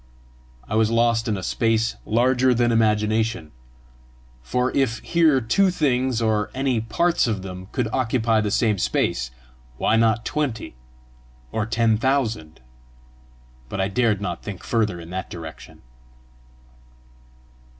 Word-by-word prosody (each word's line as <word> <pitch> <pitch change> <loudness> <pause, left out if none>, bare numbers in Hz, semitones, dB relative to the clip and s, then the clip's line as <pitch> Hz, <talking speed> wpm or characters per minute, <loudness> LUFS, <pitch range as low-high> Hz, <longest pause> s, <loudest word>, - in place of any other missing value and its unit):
I - - -6
was 110 0 +3
lost 115 0 +2
in 105 -2 0
a 95 - -6
space 115 +3 0
larger 125 +2 +3
than 120 0 +2
imagination; 110 -4 +1 0.9
for 125 - -1
if 125 -4 +1
here 160 -5 +3
two 160 - +2
things, 130 -8 0
or 110 -1 +1
any 130 -4 0
parts 170 +9 +1
of 105 -5 -2
them, 95 0 -8
could 125 -4 -1
occupy 115 -3 +1
the 105 - -1
same 105 -1 +1
space, 60 -7 0 0.5
why 110 - +2
not 115 0 +2
twenty 140 - -3 0.8
or 110 -1 -2
ten 115 -1 +2
thousand? 115 - -1 1.1
But 100 - -5
I 95 +1 0
dared 110 -1 +1
not 90 -5 -4
think 100 -4 -8
further 105 -6 0
in 85 0 -10
that 95 0 -5
direction. 80 -2 -10
115 Hz, 130 wpm, -23 LUFS, 105-125 Hz, 1.1 s, was